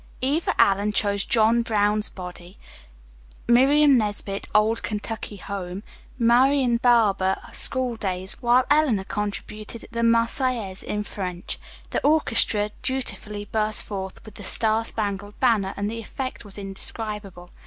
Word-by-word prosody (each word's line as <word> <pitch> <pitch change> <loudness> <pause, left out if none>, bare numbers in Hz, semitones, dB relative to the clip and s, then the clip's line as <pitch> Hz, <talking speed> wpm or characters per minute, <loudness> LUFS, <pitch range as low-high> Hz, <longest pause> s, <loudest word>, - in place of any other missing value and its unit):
Eva 290 +6 0
Allen 200 +1 +4
chose 200 -1 +1
"John 230 +1 +4
Brown's 210 -2 +1
Body." 180 0 -9 0.9
Miriam 270 +3 +5
Nesbit, 205 -2 -3
"Old 220 +2 +3
Kentucky 215 0 -5
Home." 190 0 -6 0.3
Marian 250 +1 +4
Barber, 215 -6 +3 0.2
"Schooldays," 215 -8 -1
while 245 +1 +4
Eleanor 290 -10 +3
contributed 210 +2 -5
"The 235 - -2
Marseillaise" 230 -3 +1
in 210 0 -3
French. 180 -4 -5 0.3
The - - -1
orchestra 230 -8 +2
dutifully 215 -5 -3
burst 215 0 +1
forth 190 -2 -7
with 215 - -11
"The 205 - -10
Star 220 +3 +2
Spangled 205 -2 -3
Banner," 220 -7 +2
and 200 0 -1
the 230 +2 -4
effect 255 +4 -6
was 205 -2 -9
indescribable. 195 -2 -6
215 Hz, 120 wpm, -24 LUFS, 200-235 Hz, 0.9 s, Miriam